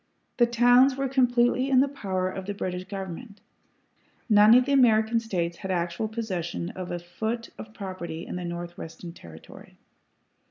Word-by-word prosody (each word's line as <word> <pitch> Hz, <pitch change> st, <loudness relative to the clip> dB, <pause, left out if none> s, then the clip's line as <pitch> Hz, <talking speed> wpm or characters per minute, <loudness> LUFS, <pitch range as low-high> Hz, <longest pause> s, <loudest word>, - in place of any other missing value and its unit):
The 240 Hz, -, +4 dB
towns 245 Hz, +3 st, +5 dB
were 270 Hz, 0 st, -1 dB
completely 250 Hz, 0 st, +2 dB
in 260 Hz, -2 st, +5 dB
the 275 Hz, -, +4 dB
power 190 Hz, -9 st, -3 dB
of 185 Hz, 0 st, -6 dB
the 205 Hz, -, -3 dB
British 180 Hz, -1 st, -4 dB
government; 195 Hz, +2 st, -7 dB, 0.9 s
none 210 Hz, 0 st, +7 dB
of 250 Hz, 0 st, +5 dB
the 280 Hz, -, -2 dB
American 230 Hz, -4 st, +4 dB
States 175 Hz, -7 st, -3 dB
had 190 Hz, -, -7 dB
actual 175 Hz, +3 st, -1 dB
possession 185 Hz, -6 st, -4 dB
of 185 Hz, -1 st, -7 dB
a 175 Hz, -, -3 dB
foot 220 Hz, +7 st, -5 dB
of 215 Hz, -, -9 dB
property 185 Hz, -5 st, -7 dB
in -, -, -6 dB
the 180 Hz, -, -4 dB
Northwestern 170 Hz, -1 st, -7 dB
Territory. 80 Hz, -, -14 dB
205 Hz, 160 wpm, -26 LUFS, 175-240 Hz, 0.9 s, none